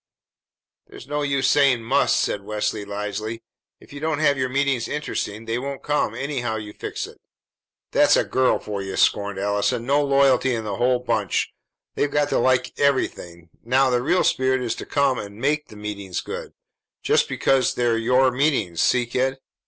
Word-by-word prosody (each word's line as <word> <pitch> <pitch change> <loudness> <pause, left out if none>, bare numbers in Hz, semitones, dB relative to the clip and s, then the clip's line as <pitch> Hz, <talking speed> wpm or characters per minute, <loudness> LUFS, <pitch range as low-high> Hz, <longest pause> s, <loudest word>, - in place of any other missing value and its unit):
"There's - - -12
no 145 +1 -2
use 140 -2 +1
saying 135 -5 +3
'must,'" 115 - +2
said 100 - -1
Leslie 105 0 -2
wisely. 105 +2 -5 0.4
"If - - -16
you 145 - -7
don't 155 0 -1
have 145 -2 +3
your 130 -1 -1
meetings 135 -3 0
interesting, 115 -7 -4
they 115 +1 -2
won't 140 +1 -6
come 150 0 0
anyhow 130 -5 -2
you 105 -1 -6
fix - - -5
it." - - -14 0.7
"That's - - +5
a - - +3
girl 130 0 +2
for 100 -2 -5
you!" 95 0 -5
scorned 100 -1 +2
Allison. 105 +4 0
"No 140 +3 +2
loyalty 135 -2 +3
in 110 - -3
the 100 -2 -4
whole 125 +1 +2
bunch. 125 0 -1 0.4
They've 145 - 0
got 145 0 +1
to - - +1
like 130 -1 +2
everything. 85 - -1
Now, 130 +2 +3
the 125 -1 +2
real 175 +8 +2
spirit 130 0 +1
is 115 -2 -1
to - - -7
come 135 -3 +1
and 100 0 -8
make 150 +3 0
the - - -14
meetings 100 -3 -5
good, - - -7 0.5
just - - +2
because 135 -2 +1
they're 120 -2 +1
your 125 +3 +3
meetings. 125 - 0
See, 125 -1 +3
kid?" 130 +3 -1
125 Hz, 180 wpm, -23 LUFS, 105-140 Hz, 0.7 s, That's